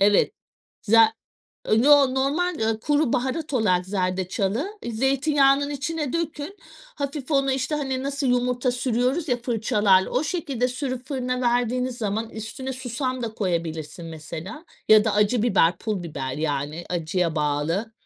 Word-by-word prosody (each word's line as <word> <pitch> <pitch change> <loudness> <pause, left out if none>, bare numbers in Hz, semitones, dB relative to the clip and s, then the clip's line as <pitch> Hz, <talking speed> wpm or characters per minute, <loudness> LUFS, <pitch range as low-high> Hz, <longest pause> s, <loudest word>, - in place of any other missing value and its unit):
Evet 205 +1 +4 0.5
za 225 +1 +5 0.5
E, 220 +2 +3
no 280 -2 +6
normal, 300 +7 +1
ııı, 220 0 0
kuru 295 0 +1
baharat 280 +5 -1
olarak 185 -7 +2
zerdeçalı 195 - -2
ı - - -2
zeytinyağının 275 +3 +2
içine 290 0 -3
dökün 335 +2 -3 0.4
hafif 280 0 -4
onu, 275 -2 +2
işte, 265 +3 -1
hani 265 -3 -2
nasıl 280 0 -2
yumurta 250 0 +1
sürüyoruz 250 +6 0
ya 245 - +2
fırçalarla 210 -5 +2
o 255 +5 0
şekilde 280 -7 -1
sürüp 255 0 -4
fırına 250 -2 -2
verdiğiniz 245 +1 0
zaman 220 +1 -2
üstüne 225 +5 -6
susam 255 0 -3
da 225 -2 -4
koyabilirsin 170 -4 -3
mesela 165 - -8 0.2
ya 215 -1 +7
da 220 -2 +1
acı 210 +2 +2
biber, 185 -7 +3
pul 210 -5 -3
biber 135 -6 -4
yani 150 +2 -2
acıya 170 0 -1
bağlı. 150 +9 -1
245 Hz, 145 wpm, -24 LUFS, 195-275 Hz, 0.5 s, ya